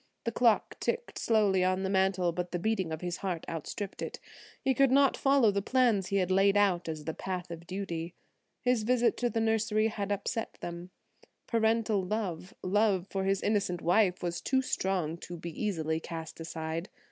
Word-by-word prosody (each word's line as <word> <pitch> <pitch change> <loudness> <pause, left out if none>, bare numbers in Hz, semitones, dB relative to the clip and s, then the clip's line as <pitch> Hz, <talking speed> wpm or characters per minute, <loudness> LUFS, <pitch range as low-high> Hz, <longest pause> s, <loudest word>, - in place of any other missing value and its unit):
The 230 - -1
clock 230 -1 +2
ticked 475 +1 -2
slowly 205 -5 +3
on 185 +1 +1
the - - 0
mantel, 190 -2 +2
but 180 +1 -4
the 175 - -1
beating 190 -2 -1
of 160 - -4
his 175 -1 -3
heart 180 -4 -3
outstripped 175 +5 -5
it. - - -5 0.4
He 265 -1 +1
could 275 +1 +4
not 275 +1 +4
follow 270 -6 +4
the 200 0 0
plans 230 -4 +2
he 200 - -2
had 185 -2 +1
laid 195 +2 +4
out 180 -5 +2
as 155 -2 -5
the 160 - -2
path 180 -1 -5
of 170 0 -8
duty. 175 -3 -4 0.5
His 250 -2 +2
visit 240 +2 +2
to 245 - +1
the 230 - -1
nursery 220 -1 +2
had 205 -2 -3
upset 205 +3 -2
them; 175 +1 -6 0.6
parental 220 -3 +1
love, 185 -3 -3
love 195 -1 +2
for 190 -1 -1
his 195 0 +1
innocent 200 -5 0
wife, 180 +1 +3
was 175 0 -2
too 265 -1 +1
strong 180 -8 -1
to 175 0 -8
be 170 +1 -6
easily 160 -5 -1
cast 165 0 -7
aside. 165 +1 -4
195 Hz, 185 wpm, -30 LUFS, 175-220 Hz, 0.6 s, could